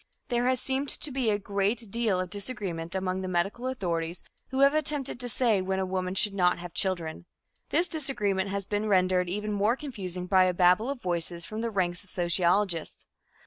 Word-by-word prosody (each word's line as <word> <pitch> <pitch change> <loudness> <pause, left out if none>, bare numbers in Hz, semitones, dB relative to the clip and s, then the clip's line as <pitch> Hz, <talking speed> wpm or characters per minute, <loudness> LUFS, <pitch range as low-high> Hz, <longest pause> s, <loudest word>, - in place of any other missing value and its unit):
There 245 0 +1
has 255 -1 +2
seemed 270 +1 -1
to 300 - -1
be 255 -3 0
a 205 - +2
great 200 +2 -1
deal 225 -5 +1
of 185 -1 -3
disagreement 195 -6 -4
among 185 0 -1
the 185 - -4
medical 190 +8 -1
authorities 170 -8 -2 0.3
who 265 0 0
have 275 +1 +6
attempted 295 -4 0
to 245 -1 -2
say 230 -5 +2
when 190 +1 -1
a 190 - 0
woman 185 0 -2
should 210 +1 +3
not 180 -2 +3
have 175 -1 -8
children. 175 -4 -1 0.4
This 345 +2 +3
disagreement 205 - -1
has 200 0 -2
been 205 +2 -1
rendered 185 -2 +3
even 210 +3 -2
more 205 +4 +2
confusing 190 - -5
by 185 0 +5
a 180 -1 +1
babel 180 +7 +4
of 275 -4 -4
voices 170 -1 -2
from 215 +1 -5
the 230 - -1
ranks 185 -3 -1
of 190 - -14
sociologists. 175 0 0
195 Hz, 195 wpm, -28 LUFS, 180-235 Hz, 0.4 s, have